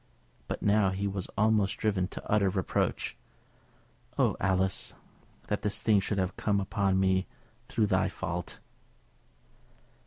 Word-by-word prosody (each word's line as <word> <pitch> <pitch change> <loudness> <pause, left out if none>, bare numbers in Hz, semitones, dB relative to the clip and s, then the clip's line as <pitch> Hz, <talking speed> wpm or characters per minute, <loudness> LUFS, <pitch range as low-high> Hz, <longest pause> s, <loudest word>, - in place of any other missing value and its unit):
But - - -4
now 100 -1 +4
he 95 +2 -2
was 95 -2 -3
almost 105 -2 +3
driven 100 -4 0
to - - -9
utter 105 -2 +3
reproach. 95 0 -1 1.0
"Oh, - - +3
Alice! 95 -1 0 0.5
that 105 - -2
this 105 0 0
thing 105 -3 +4
should 100 +1 -2
have 95 0 -1
come 100 -2 +1
upon 100 -1 +1
me 95 0 +2 0.4
through 110 - +1
thy 95 -1 +2
fault!" 90 0 -4
100 Hz, 130 wpm, -29 LUFS, 95-105 Hz, 1.0 s, now